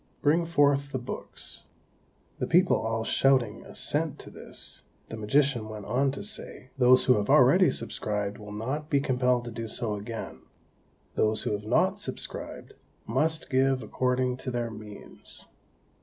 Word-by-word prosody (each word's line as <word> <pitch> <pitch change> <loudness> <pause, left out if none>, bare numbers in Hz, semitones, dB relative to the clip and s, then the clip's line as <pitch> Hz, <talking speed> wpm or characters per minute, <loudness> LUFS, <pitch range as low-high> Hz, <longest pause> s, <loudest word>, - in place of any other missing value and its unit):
Bring 165 +3 +3
forth 140 -3 +3
the 130 - -1
books." 125 - -7 0.7
The - - -1
people 180 +2 +4
all 115 0 -1
shouting 130 -3 +2
assent - - -2
to - - -11
this, - - -9 0.3
the - - -5
magician 120 +1 +1
went 105 -2 -7
on 130 +5 +2
to - - -6
say, 205 -10 -7
"Those 130 -1 +5
who 125 - +5
have 105 0 -1
already - - +6
subscribed 105 -1 -2
will 105 -1 -9
not 135 +9 -4
be 140 -3 +3
compelled 125 -3 +1
to 120 - -6
do 115 0 -5
so 110 0 -3
again; 110 +2 -6 0.7
those 110 0 +1
who - - -1
have 105 0 -3
not - - +2
subscribed - - -6 0.3
must 155 +7 0
give 130 -1 +2
according 125 +3 0
to 130 - -5
their 120 -2 -2
means." 105 -1 -11
125 Hz, 155 wpm, -28 LUFS, 110-135 Hz, 0.7 s, already